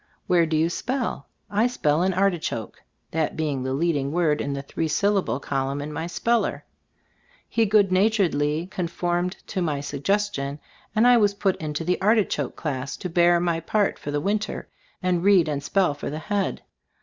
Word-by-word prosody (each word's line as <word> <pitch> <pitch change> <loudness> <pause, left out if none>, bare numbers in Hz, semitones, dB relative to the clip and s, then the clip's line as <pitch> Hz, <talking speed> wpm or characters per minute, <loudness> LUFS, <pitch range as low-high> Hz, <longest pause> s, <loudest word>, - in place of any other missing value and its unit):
"Where 170 -2 +3
do 155 0 0
you 160 +1 +3
spell?" 245 - -3 0.2
"I 210 +4 +2
spell 155 -11 +1
in 185 +1 +2
'Artichoke/" 175 - -1 0.3
that 160 -1 -1
being 150 -4 -1
the 130 +1 -2
leading 145 -3 0
word 160 -3 +1
in 140 - -2
the 140 0 -4
three 160 +3 -2
syllable 195 -1 +1
col 135 -1 -2
umn 140 +1 -3
in 150 +1 -5
my 160 +3 -3
speller. 230 +6 0 0.8
He 225 -1 +1
good 200 -2 +4
natur 200 +1 +3
edly 150 +2 -1
conformed 175 +1 -1
to 190 - -3
my 150 -5 0
suggestion, 145 0 -1 0.4
and 220 +2 +4
I 245 0 +7
was 205 -3 +3
put 195 -2 +1
into 155 0 -4
the 180 +3 0
"artichoke" 215 +1 +1
class 135 -3 -4
to 180 - -5
bear 175 0 +4
my 170 -1 0
part 205 +5 0
for - - -6
the 145 0 0
winter, 205 +5 -2 0.4
and 180 -1 +1
read 195 -4 +5
and 145 -2 -2
"spell 180 +2 +1
for 145 - -5
the 150 - -4
head." 200 +4 -2
170 Hz, 185 wpm, -24 LUFS, 150-200 Hz, 0.8 s, I